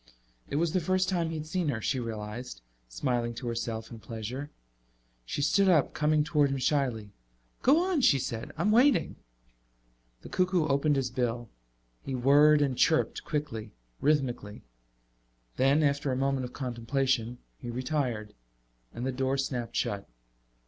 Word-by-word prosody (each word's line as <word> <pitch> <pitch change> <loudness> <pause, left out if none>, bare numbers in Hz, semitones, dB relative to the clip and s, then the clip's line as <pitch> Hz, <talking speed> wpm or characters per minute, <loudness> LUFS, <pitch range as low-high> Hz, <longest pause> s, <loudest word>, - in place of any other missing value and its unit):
It - - -3
was 165 +2 +1
the 185 - +3
first 185 +2 +1
time 170 -3 0
he 165 - -4
had 155 - -5
seen 175 +1 -1
her, 125 -6 -1
she 130 +4 -1
realized, 110 - -6 0.3
smiling 120 - -1
to 125 - -7
herself 115 -1 -3
in 115 - -8
pleasure. 115 +6 -6 0.8
She 145 - -2
stood 195 +5 +4
up, 155 -7 +3
coming 150 0 +2
toward 150 -2 +2
him 135 - -1
shyly. 125 -7 0 0.5
"Go 305 +7 +5
on," 355 -6 +1
she 140 - +5
said. 120 -3 -4
"I'm 195 +7 +2
waiting." 255 +6 +4 1.1
The - - -9
cuckoo 180 -3 +1
opened 145 +1 +2
his 130 -2 -1
bill. 120 -2 -2 0.5
He 135 - -3
whirred 145 +4 +5
and 135 -3 0
chirped, 160 +5 +2
quickly, 125 -8 -4 0.3
rhythmically. 130 -8 0 0.9
Then, 140 +4 +4
after 140 -1 +1
a - - 0
moment 135 0 0
of 125 - -9
contemplation, 125 -1 -1 0.2
he 120 - -7
retired. 125 -4 -2 0.6
And 120 - -4
the 130 - 0
door 130 +1 0
snapped 125 -3 -3
shut. 100 -1 -2
135 Hz, 155 wpm, -29 LUFS, 120-150 Hz, 1.1 s, Go